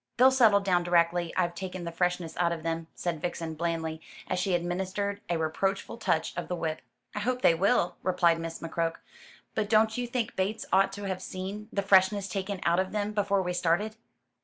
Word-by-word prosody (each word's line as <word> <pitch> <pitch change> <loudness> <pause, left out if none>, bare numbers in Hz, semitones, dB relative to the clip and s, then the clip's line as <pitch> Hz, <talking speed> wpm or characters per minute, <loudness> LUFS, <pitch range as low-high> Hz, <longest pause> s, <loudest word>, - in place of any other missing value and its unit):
"They'll 260 +2 +7
settle 225 -6 +5
down 185 -3 +2
directly 175 0 +2
I've 175 -2 +1
taken 185 0 -6
the 170 - -4
freshness 180 -1 -1
out 170 -1 +2
of 165 -2 -4
them," 165 0 -2
said 170 -3 -3
Vixen, 170 -2 -3
blandly, 160 -1 -2 0.3
as 185 - -1
she 185 0 +1
administered 190 +3 -2
a 170 - +1
reproachful 190 +7 -1
touch 175 -8 0
of - - -4
the 180 - -2
whip. 160 -2 -3 0.3
"I - - -3
hope 250 +4 -1
they - - +7
will," 185 +2 +2
replied 175 -3 +3
Miss 165 0 -5
McCroke; 165 0 -1 0.6
"but 210 -1 -1
don't 220 0 +4
you 245 - -2
think 240 -2 -2
Bates 200 +4 -1
ought 195 +1 +4
to 205 0 -7
have 190 -2 -3
seen 195 +4 -6
the 200 - -1
freshness 195 +1 +4
taken 195 0 -3
out 170 +1 +3
of 190 +1 -1
them 210 0 -1
before 200 -2 +1
we 180 0 -2
started?" 180 +5 +1
185 Hz, 200 wpm, -29 LUFS, 170-200 Hz, 0.6 s, They'll